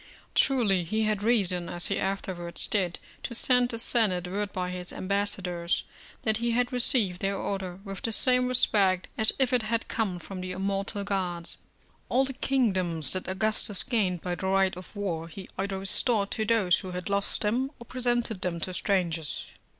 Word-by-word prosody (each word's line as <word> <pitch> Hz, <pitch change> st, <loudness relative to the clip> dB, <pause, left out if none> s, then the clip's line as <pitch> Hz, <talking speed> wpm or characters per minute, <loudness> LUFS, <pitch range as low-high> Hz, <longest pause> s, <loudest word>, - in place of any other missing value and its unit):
Truly 220 Hz, -10 st, +3 dB
he 215 Hz, +6 st, -1 dB
had 215 Hz, -2 st, 0 dB
reason, 195 Hz, -6 st, +3 dB
as 175 Hz, 0 st, -3 dB
he 200 Hz, -, 0 dB
afterwards 185 Hz, -3 st, -2 dB
did, 185 Hz, -5 st, 0 dB, 0.2 s
to 235 Hz, -, -5 dB
send 250 Hz, +1 st, +3 dB
the 230 Hz, -, -2 dB
Senate 210 Hz, -7 st, +1 dB
word 200 Hz, +2 st, -3 dB
by 180 Hz, -1 st, -3 dB
his 180 Hz, -1 st, -5 dB
ambassadors, 185 Hz, -3 st, 0 dB, 0.4 s
that 220 Hz, -1 st, +1 dB
he 235 Hz, +1 st, -1 dB
had 245 Hz, +2 st, +1 dB
received 230 Hz, -7 st, +1 dB
their 195 Hz, 0 st, 0 dB
order 190 Hz, -3 st, -3 dB
with 195 Hz, -2 st, -7 dB
the 225 Hz, -, -1 dB
same 250 Hz, +2 st, +3 dB
respect 195 Hz, -7 st, +2 dB
as 220 Hz, -, +3 dB
if 260 Hz, -2 st, +1 dB
it 250 Hz, -, +4 dB
had 230 Hz, +2 st, -1 dB
come 210 Hz, -6 st, -1 dB
from 185 Hz, +2 st, -7 dB
the 185 Hz, 0 st, -4 dB
immortal 195 Hz, +2 st, -2 dB
gods. 180 Hz, -4 st, -1 dB, 0.5 s
All 265 Hz, +2 st, +3 dB
the 270 Hz, -, -4 dB
kingdoms 185 Hz, -, +1 dB
that 185 Hz, -1 st, -3 dB
Augustus 205 Hz, +1 st, +1 dB
gained 195 Hz, -8 st, 0 dB
by 180 Hz, -, -2 dB
the 190 Hz, +2 st, -3 dB
right 190 Hz, -1 st, +2 dB
of 180 Hz, +4 st, -11 dB
war, 170 Hz, -5 st, -3 dB
he 185 Hz, +3 st, -9 dB
either 195 Hz, 0 st, -2 dB
restored 200 Hz, +2 st, +2 dB
to 220 Hz, -, 0 dB
those 210 Hz, -5 st, +3 dB
who 185 Hz, -1 st, -7 dB
had 180 Hz, -1 st, -5 dB
lost 200 Hz, 0 st, 0 dB
them 240 Hz, +6 st, +1 dB
or 235 Hz, -, -12 dB
presented 240 Hz, -5 st, 0 dB
them 170 Hz, -2 st, -1 dB
to 185 Hz, -, -2 dB
strangers. 170 Hz, -7 st, -1 dB
195 Hz, 180 wpm, -28 LUFS, 180-225 Hz, 0.5 s, it